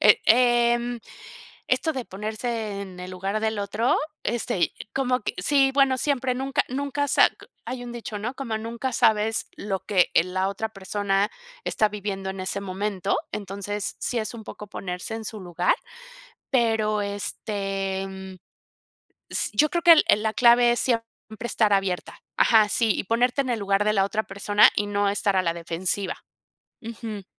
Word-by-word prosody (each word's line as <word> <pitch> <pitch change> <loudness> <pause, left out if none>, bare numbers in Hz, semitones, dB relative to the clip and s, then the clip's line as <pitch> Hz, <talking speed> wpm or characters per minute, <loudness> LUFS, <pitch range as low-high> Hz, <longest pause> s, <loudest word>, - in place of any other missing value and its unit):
Eh, 210 - +6
em, 240 0 +3 0.7
esto 320 - +1
de 260 -4 -4
ponerse 215 +1 -4
en 185 -2 -10
el 180 +1 -7
lugar 195 +3 -3
del 220 -1 -1
otro, 205 +4 +1 0.3
este, 230 -3 -1
y 165 - +2 0.2
como 255 -1 +1
que, - - -3
sí, 270 +7 +3
bueno, 270 -2 +3
siempre, 260 -3 0
nunca 270 +2 0
nunca 280 +2 -2
sa - - +6 0.4
hay 250 -1 -5
un 240 - -7
dicho, 230 -3 -6
¿no? 235 +5 -4
Como 235 -5 -3
nunca 235 +4 -4
sabes 220 -2 +2
lo 195 -2 -3
que, 190 -3 +2
eh, 165 - +5
la 185 +1 -1
otra 210 +3 -3
persona 200 0 -1 0.3
está 215 - +2
viviendo 200 -2 -4
en 190 0 -6
ese 190 +1 -1
momento, 195 0 -2 0.2
entonces, 200 0 -4
sí 245 - -1
es 220 +1 -3
un 225 -2 -9
poco 210 - -9
ponerse 180 +2 -4
en 225 0 -6
su 215 -1 -6
lugar, 175 -1 +1 0.8
pero 225 -4 +2
este, 195 -1 -3
mm, 190 0 -9 1.0
s - - +2
yo 305 - +4
creo 345 - -1
que 340 - +9
el 320 - +6
el 210 - +4
la 220 - 0
clave 240 0 +6
es 240 - 0
siempre 230 -3 +1 0.4
estar 215 -3 +2
abierta. 195 -2 -1 0.2
Ajá, 220 -3 +5
sí, 225 +1 +3
y - - -2
ponerte 245 +6 +1
en 260 - -4
el 235 - 0
lugar 200 +1 +1
de 215 - +2
la 195 -2 +3
otra 215 +2 -1
persona 205 +1 +4
y 205 - +1
no 205 0 0
estar 200 -1 0
a 185 - +3
la 170 -2 0
defensiva. 175 +3 -1 0.6
Ujú. 225 -3 -7
210 Hz, 175 wpm, -25 LUFS, 195-240 Hz, 1.0 s, que